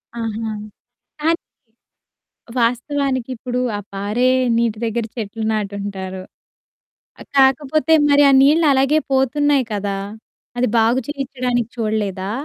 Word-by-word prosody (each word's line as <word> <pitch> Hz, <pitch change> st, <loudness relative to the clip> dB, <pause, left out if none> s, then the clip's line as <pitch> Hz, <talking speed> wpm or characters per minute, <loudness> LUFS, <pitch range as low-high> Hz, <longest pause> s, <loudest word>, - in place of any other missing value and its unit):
ఆహా! 225 Hz, -1 st, -3 dB, 0.7 s
కానీ 330 Hz, +2 st, +2 dB, 1.2 s
వాస్తవానికిప్పుడు 250 Hz, 0 st, -1 dB, 0.2 s
ఆ -, -, -4 dB
పారే 205 Hz, +6 st, 0 dB, 0.3 s
నీటి 230 Hz, -2 st, 0 dB
దగ్గర 230 Hz, 0 st, -2 dB
చెట్లు 225 Hz, -1 st, -5 dB
నాటు 210 Hz, -2 st, -2 dB
ఉంటారు. 190 Hz, -2 st, -5 dB, 1.0 s
ఆహ్, -, -, -12 dB
కాకపోతే 285 Hz, +4 st, +3 dB, 0.2 s
మరి 285 Hz, 0 st, +5 dB
ఆ -, -, +4 dB
నీళ్ళు 310 Hz, +4 st, +4 dB
అలాగే 270 Hz, +3 st, +3 dB
పోతున్నాయి 275 Hz, +1 st, +2 dB
కదా! 200 Hz, -1 st, -2 dB, 0.6 s
అది 250 Hz, -, +2 dB
బాగు 230 Hz, +3 st, +3 dB
చేయిచ్చడానికి 250 Hz, -4 st, -2 dB
చూడలేదా? 205 Hz, -3 st, -2 dB
240 Hz, 105 wpm, -19 LUFS, 215-270 Hz, 1.2 s, మరి